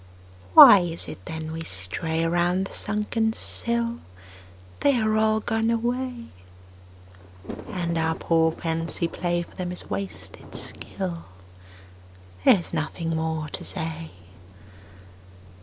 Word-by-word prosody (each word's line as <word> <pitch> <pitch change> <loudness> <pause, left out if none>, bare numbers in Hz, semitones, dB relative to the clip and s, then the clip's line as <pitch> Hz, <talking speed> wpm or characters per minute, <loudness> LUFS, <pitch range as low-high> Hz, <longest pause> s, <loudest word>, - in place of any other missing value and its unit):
Why 205 - +12
is 170 -2 -2
it 95 - -9
then 160 -1 -5
we 165 0 -5
stray 160 - -3
Around 175 +3 +1
the - - -10
sunken 215 +2 -1
sill? 235 +1 -2 0.8
They 280 -4 +3
are 215 -1 +1
all 220 0 +2
gone 225 0 0
away. 240 +1 -2 1.4
And 175 -5 -2
our 160 0 +1
poor 165 -1 +2
fancy 165 +1 -2
play 175 0 -1
For - - -17
them 180 -1 -4
is 180 - -9
wasted 195 -1 -7
skill: 175 -3 -6 1.2
There - - +7
is 175 - -8
nothing 165 +1 -2
more 160 -1 -2
to - - -5
say. 160 -2 -5
175 Hz, 120 wpm, -25 LUFS, 160-220 Hz, 1.4 s, Why